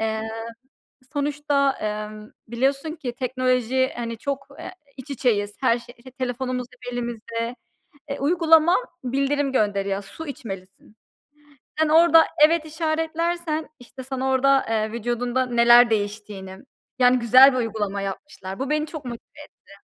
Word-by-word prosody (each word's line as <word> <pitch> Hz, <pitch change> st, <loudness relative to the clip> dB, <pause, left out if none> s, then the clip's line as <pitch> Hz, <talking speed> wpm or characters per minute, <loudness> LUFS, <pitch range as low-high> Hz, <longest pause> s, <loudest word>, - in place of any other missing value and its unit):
Eee, 220 Hz, 0 st, -1 dB, 0.9 s
sonuçta, 285 Hz, -1 st, 0 dB
eee, 215 Hz, 0 st, -5 dB, 0.2 s
biliyorsun 275 Hz, +6 st, 0 dB
ki 265 Hz, -7 st, -5 dB
teknoloji, 255 Hz, 0 st, 0 dB
hani, 230 Hz, -1 st, -4 dB
çok, 275 Hz, +2 st, -4 dB
eee, -, -, -7 dB, 0.3 s
iç 265 Hz, +2 st, -10 dB
içeyiz, 210 Hz, -6 st, 0 dB
her 240 Hz, -2 st, +3 dB
şey, 240 Hz, 0 st, -14 dB
işte, 255 Hz, +2 st, -14 dB
telefonumuz 255 Hz, -1 st, -3 dB
hep 245 Hz, -1 st, -9 dB
elimizde. 235 Hz, 0 st, -4 dB, 0.5 s
Eee, 280 Hz, -, -4 dB
uygulama 325 Hz, +2 st, +4 dB, 0.3 s
bildirim 275 Hz, +2 st, 0 dB
gönderiyor; 200 Hz, -4 st, 0 dB
su 320 Hz, +10 st, -9 dB
içmelisin. 195 Hz, -5 st, -9 dB, 0.8 s
Sen, 315 Hz, -1 st, +3 dB
orada 330 Hz, 0 st, +6 dB, 0.2 s
evet 320 Hz, 0 st, +1 dB
işaretlersen, 320 Hz, 0 st, -2 dB
işte, 260 Hz, +1 st, -11 dB
sana 265 Hz, 0 st, -3 dB
orada, 270 Hz, +1 st, +3 dB
eee, 220 Hz, -1 st, 0 dB
vücudunda 240 Hz, +2 st, -1 dB
neler 240 Hz, 0 st, +6 dB
değiştiğini, 205 Hz, -3 st, -4 dB, 0.4 s
yani, 250 Hz, 0 st, +5 dB
güzel 255 Hz, +3 st, +7 dB
bir -, -, -1 dB
uygulama 210 Hz, -4 st, -2 dB
yapmışlar. 195 Hz, -1 st, -7 dB
Bu, 270 Hz, -, -3 dB
beni 300 Hz, 0 st, +1 dB
çok 300 Hz, -4 st, -8 dB
motive 235 Hz, -1 st, -6 dB, 0.4 s
etti. 200 Hz, 0 st, -18 dB
255 Hz, 130 wpm, -23 LUFS, 225-280 Hz, 0.9 s, güzel